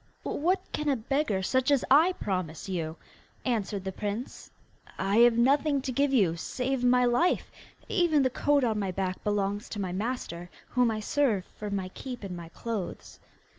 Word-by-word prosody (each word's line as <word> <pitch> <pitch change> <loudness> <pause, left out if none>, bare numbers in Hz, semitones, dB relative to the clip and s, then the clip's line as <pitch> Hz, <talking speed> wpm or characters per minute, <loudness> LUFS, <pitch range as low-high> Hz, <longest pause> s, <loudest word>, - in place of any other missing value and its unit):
'What 360 +6 +1
can 300 -1 -1
a 275 - +3
beggar 230 -4 0
such 260 +6 +1
as 280 -3 +3
I 320 +7 +6
promise 185 - -3
you?' 165 -4 -3 0.5
answered 210 -5 -1
the 190 - -3
prince. 210 +6 -5 0.5
'I 195 +2 +1
have 235 0 +6
nothing 280 +4 +3
to 270 - -2
give 280 +3 +1
you 195 -11 +3
save 250 +9 -2
my 250 0 +4
life; 245 +9 +2 0.4
even 330 -6 +3
the 260 - +1
coat 290 +2 +2
on 220 -3 +1
my 195 -2 -1
back 185 0 -3
belongs 205 +1 -1
to 210 - -5
my 190 -3 -2
master, 185 -4 -4 0.2
whom 250 -1 +3
I 215 -1 -2
serve 215 -5 +1
for 210 - -8
my 195 -2 -2
keep 250 +4 -8
and 190 -2 -5
my 170 -1 -8
clothes. 215 0 -5
230 Hz, 175 wpm, -28 LUFS, 195-270 Hz, 0.5 s, I